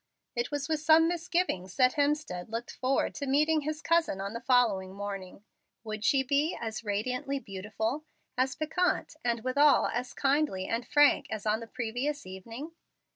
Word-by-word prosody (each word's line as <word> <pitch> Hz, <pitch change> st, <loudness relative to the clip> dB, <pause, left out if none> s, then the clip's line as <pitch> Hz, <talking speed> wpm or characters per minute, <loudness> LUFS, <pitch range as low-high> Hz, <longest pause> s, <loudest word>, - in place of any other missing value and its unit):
It 240 Hz, 0 st, -1 dB
was 290 Hz, -1 st, -3 dB
with 315 Hz, -1 st, 0 dB
some 315 Hz, +1 st, +5 dB
misgivings 340 Hz, -, -1 dB
that 255 Hz, -1 st, +4 dB
Hemstead 290 Hz, -, -1 dB
looked 230 Hz, +2 st, -4 dB
forward 260 Hz, +1 st, 0 dB
to 280 Hz, -, -5 dB
meeting 305 Hz, +3 st, +3 dB
his 310 Hz, +2 st, -4 dB
"cousin," 335 Hz, -, +2 dB
on 200 Hz, +2 st, -4 dB
the 230 Hz, -, -5 dB
following 225 Hz, -7 st, +2 dB
morning. 200 Hz, -1 st, -6 dB, 0.4 s
Would 215 Hz, -1 st, -5 dB
she 270 Hz, +2 st, +3 dB
be 285 Hz, +5 st, +1 dB
as 225 Hz, -1 st, -4 dB
radiantly 250 Hz, +6 st, -2 dB
beautiful, 220 Hz, +6 st, -4 dB, 0.3 s
as 260 Hz, +1 st, +1 dB
piquant, 360 Hz, +4 st, 0 dB
and 235 Hz, -2 st, 0 dB
withal 285 Hz, +3 st, +4 dB
as 250 Hz, +1 st, -3 dB
kindly 275 Hz, -9 st, +1 dB
and 230 Hz, +1 st, -2 dB
frank 290 Hz, 0 st, +4 dB
as 215 Hz, -1 st, -5 dB
on 215 Hz, +1 st, +2 dB
the 230 Hz, -, -8 dB
previous 250 Hz, +5 st, -3 dB
evening? 225 Hz, -, -8 dB
255 Hz, 165 wpm, -30 LUFS, 215-295 Hz, 0.4 s, some